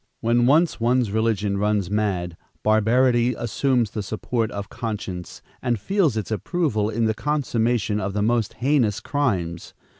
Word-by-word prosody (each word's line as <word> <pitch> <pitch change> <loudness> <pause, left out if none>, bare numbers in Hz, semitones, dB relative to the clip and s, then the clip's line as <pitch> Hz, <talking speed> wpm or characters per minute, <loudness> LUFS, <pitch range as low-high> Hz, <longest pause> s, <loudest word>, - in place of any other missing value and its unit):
When 120 +1 +2
once 155 +3 +3
one's 120 -1 +2
religion 105 -2 0
runs 105 -2 0
mad, 95 -5 -1 0.3
barbarity 120 +3 +3
assumes 120 0 0
the 105 - -3
support 110 +2 -2
of 100 -1 -5
conscience 105 -7 -6 0.2
and 120 -3 0
feels 165 - +1
its 110 0 -3
approval 110 - 0
in 115 +1 0
the 110 - +2
consummation 115 -4 0
of 100 0 -3
the 105 0 0
most 115 -1 +1
heinous 120 -3 +1
crimes. 95 - -2
110 Hz, 145 wpm, -23 LUFS, 105-125 Hz, 0.3 s, once